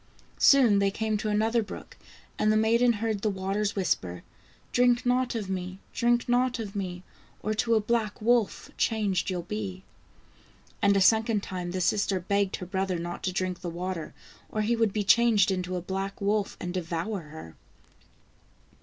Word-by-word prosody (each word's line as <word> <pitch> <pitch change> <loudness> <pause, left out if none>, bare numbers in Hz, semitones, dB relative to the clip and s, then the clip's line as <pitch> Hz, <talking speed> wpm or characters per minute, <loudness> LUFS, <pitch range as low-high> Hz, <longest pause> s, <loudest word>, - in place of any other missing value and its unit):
Soon 245 -8 +6
they 200 0 +3
came 220 +2 -1
to 215 +1 -3
another 220 +3 +2
brook, 210 - -9 0.4
and 215 - +3
the 215 - +3
maiden 235 +2 +4
heard 220 -1 -2
the 215 - +1
waters 200 +1 -2
whisper: 90 - -1 0.2
" - - -31
Drink 245 0 +3
not 250 0 +1
of 215 -4 -3
me! 185 0 -4
drink 240 0 +2
not 245 +1 +2
of 210 -4 -6
me! 180 -2 -4 0.4
Or 215 - 0
to 230 +2 +1
a - - +4
black 215 -1 -1
wolf 230 -2 +1
changed 205 -5 0
you'll 180 -2 -2
be." 190 -1 -5 1.0
And 200 -1 +4
a - - +3
second 220 +1 +3
time 180 -2 -5
the 185 +1 -3
sister 195 +1 +1
begged 200 +2 0
her 180 - -7
brother 190 0 -1
not 175 +1 -5
to 185 - 0
drink 185 -1 -2
the 175 - -4
water 175 -1 -5 0.3
or 215 - -2
he 235 +3 +1
would 225 -3 +2
be 210 +1 -1
changed 215 -2 +4
into 185 -1 -2
a 180 - -2
black 195 +2 -4
wolf 205 0 0
and 175 0 -4
devour 180 +3 -3
her. 150 - -11
200 Hz, 180 wpm, -27 LUFS, 185-220 Hz, 1.0 s, Soon